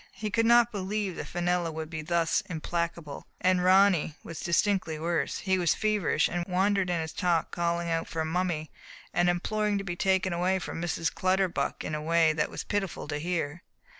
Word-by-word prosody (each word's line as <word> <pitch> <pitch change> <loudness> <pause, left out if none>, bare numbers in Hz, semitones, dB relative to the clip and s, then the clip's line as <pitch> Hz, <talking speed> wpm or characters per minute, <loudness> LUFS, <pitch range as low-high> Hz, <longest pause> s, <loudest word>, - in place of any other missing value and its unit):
He 215 -1 -4
could 230 +2 +2
not 240 0 +6
believe 200 -2 -2
that - - -5
Fenella 175 -1 0
would 160 0 -6
be 160 -1 -4
thus 165 +1 +1
implacable. 165 -2 -4
And 185 -1 +2
Ronny 185 -4 +4
was 165 - -8
distinctly 175 -2 +1
worse, 170 +2 -1
he 190 -1 0
was 175 -3 +2
feverish, 210 -7 +1
and 175 0 -2
wandered 190 0 +1
in 175 -1 0
his 160 -1 -5
talk,' 170 -3 0
calling 170 0 -1
out 165 0 -1
for 160 -1 -2
''Mum 180 +3 0
my'* 155 -3 -3 0.4
and 175 0 +3
imploring 210 +4 0
to 195 - -3
be 175 -3 -4
taken 190 0 +1
away 180 +2 +1
from 165 -2 -5
Mrs. 165 -2 -1
Clutterbuck 185 -1 0
in - - -4
a 150 - -2
way 165 0 +3
that 150 -1 0
was - - -5
pitiful 200 -6 -3
to 145 -1 -2
hear. 165 -1 -2
175 Hz, 195 wpm, -28 LUFS, 165-190 Hz, 0.4 s, not